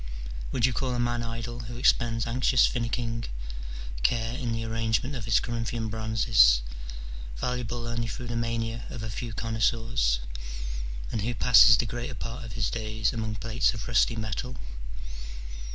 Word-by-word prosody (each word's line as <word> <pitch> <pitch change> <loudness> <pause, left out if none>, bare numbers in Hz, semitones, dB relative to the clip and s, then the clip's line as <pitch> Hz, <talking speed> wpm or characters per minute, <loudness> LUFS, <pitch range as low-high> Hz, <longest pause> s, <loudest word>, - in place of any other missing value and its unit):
Would 120 -3 +3
you 130 - +2
call 130 -1 0
a - - -1
man 120 0 +1
idle 115 +1 -4
who 120 - -6
expends 115 -2 +3
anxious 125 +1 +4
finicking 115 -1 -1 0.8
care 115 - +1
in 125 -3 -2
the 115 0 -2
arrangement 115 +4 0
of 115 -4 -4
his 115 - +4
Corinthian 115 -1 -2
bronzes, 105 - +4 0.7
valuable 120 - -2
only 115 0 -1
through 120 +3 -5
the 120 -1 -3
mania 115 0 -1
of 115 - -6
a 110 - -3
few 115 +3 -4
connoisseurs? 115 - +1 0.9
and 110 - -1
who 120 +3 -1
passes 115 -2 +8
the 120 - +1
greater 120 +2 -4
part 115 +2 -5
of 110 -3 -8
his 105 - 0
days 110 -2 -1
among 110 -2 -2
plates 115 +4 +1
of 105 - -6
rusty 115 0 +3
metal 110 +3 -3
115 Hz, 155 wpm, -28 LUFS, 110-120 Hz, 0.9 s, passes